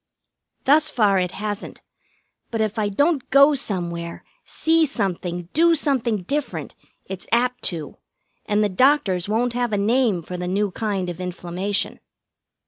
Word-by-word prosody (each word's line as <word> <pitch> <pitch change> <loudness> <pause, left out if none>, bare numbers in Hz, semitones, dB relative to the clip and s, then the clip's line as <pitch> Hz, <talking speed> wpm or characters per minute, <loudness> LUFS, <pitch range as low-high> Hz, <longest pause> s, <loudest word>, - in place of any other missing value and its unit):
Thus 310 +3 +5
far 205 -5 +3
it 180 -1 -2
hasn't, 210 -1 -5 0.7
but 225 - -3
if 220 +1 -1
I 210 -1 +1
don't 285 - +1
go 280 +2 +6
somewhere, 170 -9 -2 0.2
see 325 0 +2
something, 180 -7 -3
do 335 +1 +4
something 250 - 0
different, 290 +9 -3 0.3
it's 190 -2 -7
apt 250 +2 +1
to, 160 -5 -4 0.5
and 210 0 +2
the - - +3
doctors 200 - +2
won't 235 +3 +1
have 245 -1 -1
a - - +2
name 215 -3 +2
for 180 +3 -6
the 180 0 -4
new 200 +2 0
kind 195 -2 -2
of 175 0 -5
inflammation. 180 +2 -3
210 Hz, 145 wpm, -22 LUFS, 180-255 Hz, 0.7 s, go